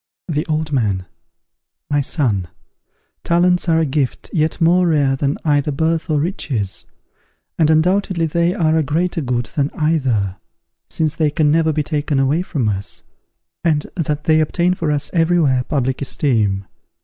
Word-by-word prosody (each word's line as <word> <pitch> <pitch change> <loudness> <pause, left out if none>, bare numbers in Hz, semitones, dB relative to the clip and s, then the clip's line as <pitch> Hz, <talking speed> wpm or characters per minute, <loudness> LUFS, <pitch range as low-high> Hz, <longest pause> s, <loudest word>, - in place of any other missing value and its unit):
The 150 -3 -2
Old 155 -1 -1
Man. 100 -9 0 0.8
My 145 0 +1
son, 115 - 0 0.8
talents 180 +1 +2
are 165 - +4
a 165 - +2
gift 140 -2 -2
yet 155 0 0
more 175 +2 +4
rare 145 -4 +2
than 140 +1 -1
either 145 0 +2
birth 160 +4 -1
or 150 -2 +2
riches, 135 - -3 0.7
and 155 -2 +4
undoubtedly 175 +2 +2
they 170 +3 +1
are 160 -2 +2
a - - +3
greater 165 +4 -1
good 125 -3 -1
than 145 -2 +1
either, 130 - 0 0.5
since 160 0 -1
they 155 -2 +2
can 150 0 +2
never 160 0 +3
be 150 0 -1
taken 145 -1 -1
away 140 +5 +2
from 145 -10 -2
us, 100 -1 -3 0.6
and 155 -3 +1
that 150 -3 -2
they 155 0 +3
obtain 175 +3 +1
for 165 -4 -1
us 145 0 -1
every 175 0 +3
where 130 -5 +2
public 130 -3 -1
esteem. 110 -8 0
150 Hz, 160 wpm, -19 LUFS, 135-165 Hz, 0.8 s, are